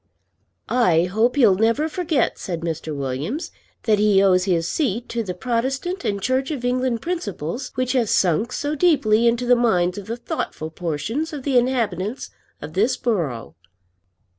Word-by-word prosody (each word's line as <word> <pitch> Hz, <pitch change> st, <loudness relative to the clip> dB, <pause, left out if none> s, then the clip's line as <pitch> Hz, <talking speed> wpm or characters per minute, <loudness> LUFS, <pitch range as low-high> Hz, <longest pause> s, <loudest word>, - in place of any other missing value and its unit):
"I 180 Hz, -10 st, +3 dB
hope 220 Hz, +8 st, +1 dB
he'll 235 Hz, -9 st, +5 dB
never 230 Hz, +10 st, +2 dB
forget," 320 Hz, -5 st, 0 dB
said 170 Hz, -3 st, -4 dB
Mr. 160 Hz, -2 st, -4 dB
Williams, 140 Hz, -, -3 dB, 0.3 s
"that 215 Hz, -2 st, +2 dB
he 210 Hz, -2 st, +4 dB
owes 185 Hz, -2 st, +4 dB
his 170 Hz, -4 st, +1 dB
seat 240 Hz, -, -1 dB
to 235 Hz, -, -2 dB
the 185 Hz, -5 st, -4 dB
Protestant 265 Hz, -, -2 dB
and 200 Hz, -1 st, -1 dB
Church 260 Hz, +5 st, 0 dB
of 275 Hz, -6 st, -4 dB
England 250 Hz, -2 st, 0 dB
principles 240 Hz, -, -4 dB
which 255 Hz, -1 st, 0 dB
have 245 Hz, -5 st, +1 dB
sunk 190 Hz, +7 st, +2 dB
so 290 Hz, +3 st, -2 dB
deeply 235 Hz, -9 st, +3 dB
into 235 Hz, +1 st, +1 dB
the 245 Hz, 0 st, +5 dB
minds 185 Hz, -6 st, +1 dB
of 200 Hz, -, -10 dB
the 230 Hz, +2 st, -4 dB
thoughtful 160 Hz, -8 st, -4 dB
portion 180 Hz, -, -3 dB
of 290 Hz, -4 st, -6 dB
the 275 Hz, -1 st, -1 dB
inhabitants 235 Hz, -3 st, 0 dB, 0.3 s
of 150 Hz, +1 st, -7 dB
this 215 Hz, +8 st, +2 dB
borough." 165 Hz, -, -2 dB
230 Hz, 165 wpm, -22 LUFS, 180-255 Hz, 0.3 s, he'll